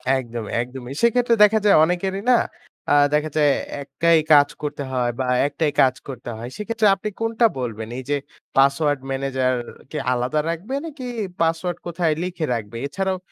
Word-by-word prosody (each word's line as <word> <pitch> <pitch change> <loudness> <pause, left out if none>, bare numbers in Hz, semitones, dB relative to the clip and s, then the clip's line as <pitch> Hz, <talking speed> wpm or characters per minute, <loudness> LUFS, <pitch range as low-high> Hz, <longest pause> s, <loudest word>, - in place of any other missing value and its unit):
একদম, 120 -3 -4 0.2
একদমই। 125 +1 -7
সেক্ষেত্রে 235 0 +3
দেখা 220 +1 +5
যায় 205 - +6
অনেকেরই 190 +4 -1
না, 240 - +6 0.5
আ - - +6 0.2
দেখা 150 +1 +1
যায় 150 -2 +5 0.3
একাই 160 +4 +2
কাজ 145 -1 +6
করতে 145 -1 -4
হয়, 125 -2 0
বা 130 - 0 0.2
একটাই 150 0 -1
কাজ 130 -1 +4
করতে 125 -3 -7
হয়। 120 +2 -6
সেক্ষেত্রে 220 0 +1
আপনি 205 +2 -4
কোনটা 225 +1 +2
বলবেন? 115 -3 -4
এই 130 - -5
যে 145 - +2 0.4
পাসওয়ার্ড 140 +1 +3
ম্যানেজার 135 -1 0 0.4
কে 155 - -4 0.2
আলাদা 125 +5 0
রাখবে? 180 +10 -4
নাকি 285 -5 -7 0.4
পাসওয়ার্ড 165 +1 0
কোথায় 170 -2 0
লিখে 180 -3 -3
রাখবে? 110 0 -6
এছাড়াও 190 +4 -2
150 Hz, 160 wpm, -22 LUFS, 130-190 Hz, 0.5 s, যায়